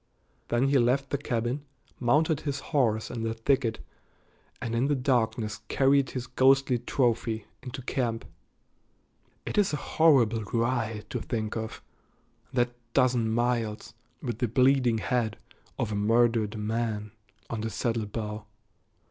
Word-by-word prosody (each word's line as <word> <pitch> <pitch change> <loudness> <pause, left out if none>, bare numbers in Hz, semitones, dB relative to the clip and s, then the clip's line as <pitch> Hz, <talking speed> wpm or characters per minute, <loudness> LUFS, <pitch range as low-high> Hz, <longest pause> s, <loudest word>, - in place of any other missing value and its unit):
Then 125 +3 +2
he 140 -1 +4
left 130 +3 +1
the 140 - +1
cabin, 120 +1 -2 0.4
mounted 150 +5 +3
his 140 -1 -2
horse 110 -6 +2
in 120 - -4
the 115 0 -2
thicket, 115 0 +1 0.8
and 120 -3 -4
in 120 +4 +2
the 145 - +2
darkness 115 -5 0
carried 135 0 +3
his 125 -2 -4
ghostly 130 0 +3
trophy 115 -3 0 0.2
into 130 0 -7
camp. 120 -3 -2 1.2
It - - 0
is 195 -6 +2
a - - +1
horrible 130 -8 +3
ride 115 -2 -1
to - - -2
think 110 -2 -3
of, 110 -1 -5 0.7
that 120 -2 +1 0.2
dozen 125 -4 +3
miles, 120 -1 -1 0.3
with 120 -4 -3
the 125 - +1
bleeding 125 0 +3
head 110 -2 -1 0.4
of 110 - -1
a - - -1
murdered 115 0 +2
man 105 -1 -2 0.4
on 115 -2 -2
the 110 - -2
saddle 115 -1 -1
bow. 105 0 -5
120 Hz, 140 wpm, -28 LUFS, 110-130 Hz, 1.2 s, he